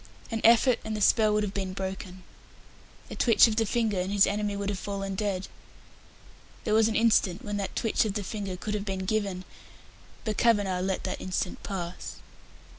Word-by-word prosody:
An 225 -1 -2
effort, 235 +1 +5
and 220 0 -3
the - - -3
spell 215 +1 +4
would 210 0 +2
have 200 -1 -3
been 190 -2 -3
broken. 190 -1 -6 0.9
A - - -5
twitch 235 -1 +6
of 220 - -1
the 225 -1 +1
finger, 220 -3 0
and 185 +2 -2
his 200 -1 +5
enemy 205 0 -1
would 200 0 -2
have 200 -2 -3
fallen 195 -1 -4
dead. 195 -1 -2 1.2
There 215 - 0
was 220 0 +5
an 220 - -2
instant 210 -5 +2
when 205 0 -3
that 200 -1 -4
twitch 225 - +1
of 210 -3 -3
the 205 - -2
finger 195 -2 -5
could 210 +3 -4
have 210 -1 -2
been 190 -2 -3
given, 195 -3 -1 0.8
but 215 -2 -2
Kavanagh 205 -6 +2
let 190 0 -1
that 185 - -4
instant 185 0 -3
pass. 180 -3 -5
205 Hz, 190 wpm, -28 LUFS, 190-215 Hz, 1.2 s, twitch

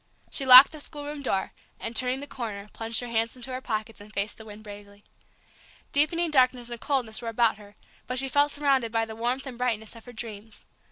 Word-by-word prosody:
She 270 - -1
locked 255 +2 +11
the 310 - -9
schoolroom 290 0 -6
door, 195 -8 -2 0.3
and, 230 +1 -6
turning 255 +2 +1
the - - -6
corner, 215 -7 -7
plunged 225 +1 -3
her 245 - -6
hands 230 0 -1
into 255 +1 -7
her 255 - -4
pockets, 220 -3 -5
and 210 +1 -14
faced 205 0 -3
the 220 - -11
wind 215 0 -12
bravely. 205 -1 -13 0.9
Deepening 325 +3 +2
darkness 255 -3 +2
and 235 - -7
coldness 250 -6 -1
were 230 - -4
about 230 -1 +1
her, 205 -1 -16 0.3
but 255 - -3
she 270 +1 +1
felt 285 +2 +2
surrounded 275 -6 0
by 225 0 0
the 220 0 -9
warmth 245 +4 -2
and 250 -3 -9
brightness 225 -3 -2
of 230 - -14
her 245 - -11
dreams. 220 -2 -10
235 Hz, 215 wpm, -26 LUFS, 220-265 Hz, 0.9 s, locked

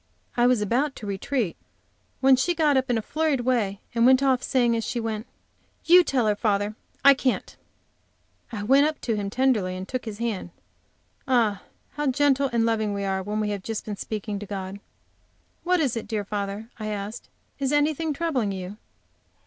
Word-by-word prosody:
I 240 0 +4
was 245 -4 +3
about 265 +7 0
to 215 - -8
retreat, 200 +1 -2 0.7
when 265 0 +7
she 345 +7 0
got 305 -3 +3
up 265 0 +1
in 240 - +2
a 220 - -2
flurried 305 -2 0
way 230 -6 0
and 230 0 +2
went 260 +2 +6
off, 260 -2 +3
saying, 240 -3 +2
as 225 - -1
she 240 - -2
went: 225 0 -3 0.6
"You 355 +1 +8
tell 260 -8 +1
her, 210 -1 +2
father; 205 0 0 0.3
I 280 - +10
can't." 260 -1 -1 1.0
I 210 -3 -4
went 275 +7 +5
up 310 - -4
to 230 - -1
him 200 -1 -2
tenderly 215 -6 +1
and 185 +1 -6
took 255 -1 -4
his 215 -2 -6
hand. 225 -6 -3 0.8
Ah, 230 -6 +2 0.3
how 295 0 -2
gentle 275 0 +2
and 230 -1 +2
loving 220 -3 0
we 200 - -3
are 190 -1 -1
when 210 +3 -3
we 210 -1 0
have 200 -2 -3
just 220 +2 -4
been 210 - -4
speaking 210 0 -4
to 210 - -8
God! 195 0 -5 0.8
"What 360 0 +2
is 275 -7 +1
it, 230 - -4
dear 210 -3 -2
father?" 205 +2 -4
I 215 - -4
asked; 210 +2 -5 0.3
"is 270 -1 0
anything 300 +2 +1
troubling 280 -9 -1
you?" 190 +1 -6
230 Hz, 190 wpm, -25 LUFS, 205-270 Hz, 1.0 s, I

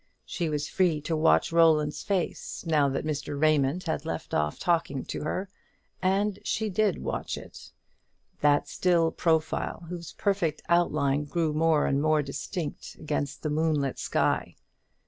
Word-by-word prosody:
She 170 -3 -2
was 150 -1 -2
free 175 -5 +1
to 160 +2 -2
watch 160 +1 +3
Roland's 160 -3 +3
face 190 -1 -3
now 150 -4 +3
that 135 - -2
Mr. 145 -1 -3
Raymond 155 +2 +2
had 160 - -2
left - - -5
off 75 0 0
talking 165 -6 0
to - - -5
her, 185 +6 -2 0.5
and 195 +2 +1
she 220 -1 -1
did 205 -1 +1
watch - - -3
it; - - -11 0.7
that 145 0 +3
still 170 -3 +2
profile 160 +1 0
whose 170 -2 -7
perfect 195 -6 -1
outline 150 -4 +2
grew 160 +1 -1
more 160 -1 +3
and 140 +1 +1
more 155 -1 +3
distinct 150 +3 -5
against 145 -2 -3
the 155 - -1
moonlit 150 -3 0
sky. - - 0
155 Hz, 145 wpm, -27 LUFS, 145-175 Hz, 0.7 s, watch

